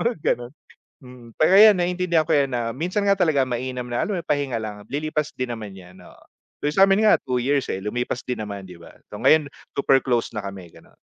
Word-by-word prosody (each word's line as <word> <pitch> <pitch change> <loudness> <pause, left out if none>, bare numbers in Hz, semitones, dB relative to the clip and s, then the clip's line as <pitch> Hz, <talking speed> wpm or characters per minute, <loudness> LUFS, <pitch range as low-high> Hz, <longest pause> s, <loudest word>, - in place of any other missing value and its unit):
mga 235 +1 0 0.2
gano'n, 120 +1 -11 0.5
mm. 125 -2 -13
Kaya 170 +5 +4 0.2
'yan - - -4
naiintindihan 175 -2 +1
ko 160 - -4
'yan 140 -3 +2
na 115 -1 -2
minsan 180 - -2
nga 200 -1 +2
talaga 155 -6 +3
mainam 125 0 -4
na 120 - -1
alam 205 - -1
mo - - -2
'yung - - -33
pahinga 140 -6 -1
lang, 105 -1 -8
lilipas 150 +1 -3
din 125 -1 -3
naman 105 -4 -7
'yan, 90 0 -14
oo. 90 - -17 0.4
'Yung 145 - +1
sa'min 195 +2 +4
nga 215 - +5
2 130 -1 -4
years, 140 0 0
eh, 95 - -4
lumipas 120 +4 -3
din 125 -2 -4
naman 100 -2 -6
'di 90 -2 -12
ba, 85 - -15 0.2
so - - -8
ngayon 155 -2 +3 0.2
super 135 -1 +3
close 120 -3 -1
na 110 - -4
kami 95 -4 -8
gano'n. - - -20
130 Hz, 225 wpm, -23 LUFS, 115-155 Hz, 0.5 s, nga